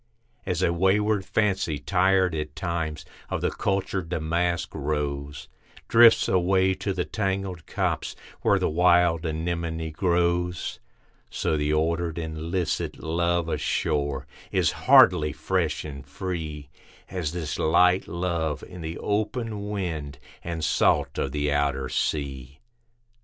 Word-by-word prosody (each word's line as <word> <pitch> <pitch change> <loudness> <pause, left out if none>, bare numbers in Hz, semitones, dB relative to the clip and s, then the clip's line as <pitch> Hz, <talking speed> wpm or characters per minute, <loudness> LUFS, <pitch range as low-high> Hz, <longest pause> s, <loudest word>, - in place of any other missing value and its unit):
As 90 0 0
a 85 - +2
wayward 100 +3 +2
Fancy, 95 -7 0
tired 95 +1 +2
at 75 -2 -4
times, 85 -4 -3 0.2
of - - -2
the - - 0
cultured 95 -3 -2
Damask 85 +1 -1
Rose, 75 -1 -3 0.4
Drifts 115 0 +6
away 95 +1 +3
to 100 - -3
the 90 -2 -1
tangled 95 -4 -3
copse, - - -2 0.3
where - - +3
the - - +1
wild 85 0 +3
Anemone 80 0 -3
grows; 90 +1 0 0.5
So - - -1
the 75 0 0
ordered 80 +1 0
and 80 -1 -5
licit 90 -2 -1
love 85 +1 0
ashore, 70 -4 -1 0.3
is - - +2
hardly 75 -1 +5
fresh 85 -4 -1
and 70 -2 -7
free 75 -1 -5 0.4
As 90 -5 -3
this 80 -4 -4
light 90 +3 +4
love 85 -3 -2
in 90 -1 -10
the 80 +1 -5
open 105 0 -2
wind 80 -8 -4 0.3
and 85 -2 -4
salt 75 -1 +2
of - - -1
the 75 0 -1
outer 70 -2 0
sea. 70 -1 -3
85 Hz, 125 wpm, -26 LUFS, 75-90 Hz, 0.5 s, Drifts